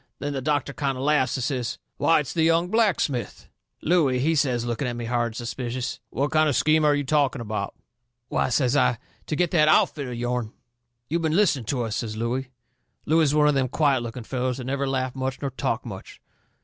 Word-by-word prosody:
Then 145 +1 -3
the 135 - -3
doctor 145 0 0
kind 135 -2 -2
o' 130 - -4
laughs 140 -3 +2
and 130 - -3
says: 125 -3 -2 0.2
"Why, 165 -2 +4
it's 140 - -6
the 165 - 0
young 165 +2 +3
blacksmith!" 185 - 0 0.4
Looey, 150 -6 +3
he 150 +6 +2
says, 130 -6 +1
looking 120 +2 -2
at 120 - -3
me 120 -1 -5
hard 120 0 0
and 115 - -9
suspicious: 120 +1 -4
"What 140 +2 -1
kind 155 -1 +3
of 140 - 0
a - - +2
scheme 155 0 +3
are 150 -1 +4
you 145 - -1
talking 140 -1 +1
about?" 105 -3 -4 0.5
"Why," - - 0
says 130 +1 +2
I, 125 -4 +3 0.3
"to 155 - -1
get 175 +1 +1
that 155 -3 +4
outfit 145 -2 +3
of 125 - -5
yourn." 120 -1 -2 0.5
"You've 170 +3 -1
been 160 -1 0
listening 165 - +2
to 125 +1 -1
us," 110 -1 -3
says 110 -2 -4
Looey. 125 +3 -2 0.6
Looey 160 +2 +3
was 150 -2 +3
one 150 -1 +5
of 150 - +4
them 135 -2 +1
quiet 140 -1 +2
looking 120 +1 -6
fellers 125 +1 -2
that 130 - -6
never 140 +2 -2
laughed 130 -1 -1
much 130 0 -3
nor 140 -1 -3
talked 130 -2 -2
much. 95 -5 -9
135 Hz, 225 wpm, -25 LUFS, 120-150 Hz, 0.6 s, one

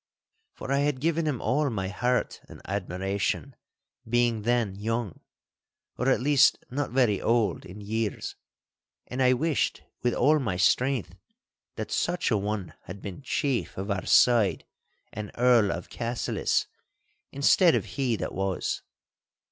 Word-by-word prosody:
For 135 - -6
I 140 - +3
had 145 -2 0
given 165 +2 0
him 140 -6 -1
all 145 +2 +1
my 95 -5 -2
heart 125 +5 -1
and - - -11
admiration, 95 +6 -2 0.5
being 120 -2 +2
then 115 -2 +1
young—or 115 +4 -6
at 130 - +3
least 140 +2 +4
not 140 +1 -2
very 120 -5 +2
old 115 -6 +1
in 95 +3 -10
years—and 110 +4 -6
I 125 0 +5
wished 150 +3 0 0.2
with 120 -1 +1
all 155 +2 +4
my 110 -10 -2
strength 110 - +2 0.6
that - - -5
such 175 -5 0
an 105 -3 +2
one 105 -2 -3
had 95 +3 -8
been 100 +5 -7
chief 135 -2 -1
of 100 +2 -3
our 95 -2 -2
side 115 -6 +4 0.5
and 105 -1 -5
Earl 120 -4 +4
of - - -5
Cassillis, 120 0 -1 0.7
instead 160 +5 +4
of - - -1
he 130 -5 -1
that - - -4
was. 95 -1 -2
120 Hz, 140 wpm, -27 LUFS, 100-135 Hz, 0.7 s, I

